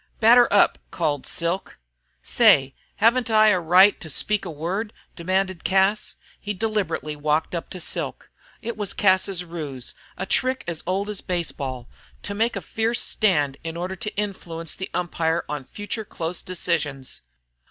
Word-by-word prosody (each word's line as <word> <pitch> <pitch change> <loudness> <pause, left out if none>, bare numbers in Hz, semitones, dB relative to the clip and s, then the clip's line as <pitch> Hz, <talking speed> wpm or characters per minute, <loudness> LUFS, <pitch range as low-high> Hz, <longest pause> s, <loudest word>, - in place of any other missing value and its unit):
"Batter 240 +2 +6
up," 205 - +4
called 150 -5 -1
Silk. 170 +3 -2 0.5
"Say, 135 0 +5 0.2
haven't 235 +2 +3
I 215 -1 +6
a 185 -3 +3
right 180 +4 +5
to 160 - -8
speak 210 +7 +1
a - - -4
word?" 180 +8 -3 0.2
demanded 185 0 -1
Cas. 195 +2 +2 0.2
He 210 0 -4
deliberately 210 -7 -2
walked 150 +3 0
up 170 - -4
to 185 - -7
Silk. 170 - -3 0.3
It 235 +1 -3
was 205 -2 -3
Cas's 190 -2 +2
ruse, 150 -7 -6 0.2
a 185 - -3
trick 255 +6 +1
as 170 -2 -3
old 195 +2 0
as 210 -2 -4
baseball, 140 -8 -3 0.4
to 200 - -4
make 225 +4 0
a - - -3
fierce 225 +1 -1
stand 150 -10 +1
in 165 0 -5
order 180 +2 -3
to 210 - -5
influence 170 -5 -3
the 190 - -6
umpire 165 -1 -1
on 150 -2 -4
future 205 - -5
close 170 -3 -4
decisions. 155 -7 -3
185 Hz, 155 wpm, -24 LUFS, 160-210 Hz, 0.5 s, Batter